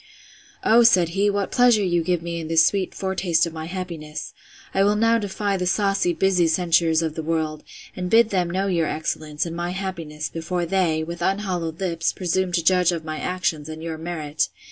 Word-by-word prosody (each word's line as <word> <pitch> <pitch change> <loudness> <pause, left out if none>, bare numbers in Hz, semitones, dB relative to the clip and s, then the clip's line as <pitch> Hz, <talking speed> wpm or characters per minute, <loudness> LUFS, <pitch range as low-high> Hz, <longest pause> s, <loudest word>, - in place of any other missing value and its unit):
O, 230 +2 +6
said 185 -8 +5
he, 195 +4 +1
what 200 -1 -1
pleasure 245 -4 +4
you 175 -2 +1
give 170 0 -1
me 170 0 -4
in 160 - -5
this 160 0 +5
sweet 195 -1 0
foretaste 190 -4 +1
of 165 - -6
my 160 -1 -6
happiness! 170 -4 -6 0.4
I 195 - +3
will 205 +1 +3
now 230 +2 +3
defy 200 -1 -2
the 180 -1 -2
saucy, 195 -1 +1
busy 180 0 +2
censurers 165 -1 +2
of 160 -1 -2
the 160 - -4
world; 155 -1 -2 0.3
and 180 0 -4
bid 225 +1 +5
them 180 -3 +1
know 190 +3 -1
your 170 -5 +1
excellence, 155 0 -3
and 165 -1 -5
my 175 +1 -3
happiness, 170 -5 -4
before 170 +2 -3
they, 170 -3 +1
with 170 +1 -7
unhallowed 180 -4 -1
lips, 170 -3 -1
presume 185 0 -1
to 170 -1 +1
judge 180 0 +4
of 165 -2 -4
my 155 -1 -4
actions, 165 -5 -2
and 160 0 -7
your 160 -1 -5
merit! 160 -3 -2
175 Hz, 200 wpm, -23 LUFS, 160-190 Hz, 0.4 s, O